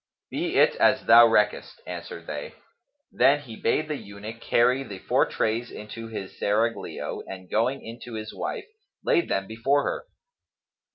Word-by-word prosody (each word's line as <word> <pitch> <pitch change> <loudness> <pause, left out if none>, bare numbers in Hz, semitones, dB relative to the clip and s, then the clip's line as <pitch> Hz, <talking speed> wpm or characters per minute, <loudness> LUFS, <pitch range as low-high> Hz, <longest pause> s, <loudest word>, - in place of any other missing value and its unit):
"Be - - -2
it - - +6
as - - +3
thou 115 +1 +9
reckest," 105 -2 +1
answered 85 -1 -7
they. 75 -2 -6 0.6
Then 145 +2 +4
he 120 -6 -10
bade 150 +8 0
the 150 -2 -2
eunuch 105 +2 -9
carry 125 +3 +3
the 105 -8 -7
four - - +2
trays 115 +2 -1
into 115 +2 -8
his 105 -4 -7
serraglio 110 +3 -1
and 95 -1 -9
going 125 +5 0
in 115 +2 -8
to 120 - -9
his 110 -1 -6
wife, 435 -5 -4 0.4
laid 345 - +2
them 95 - 0
before 130 +7 +1
her. - - -3
115 Hz, 160 wpm, -26 LUFS, 105-125 Hz, 0.6 s, thou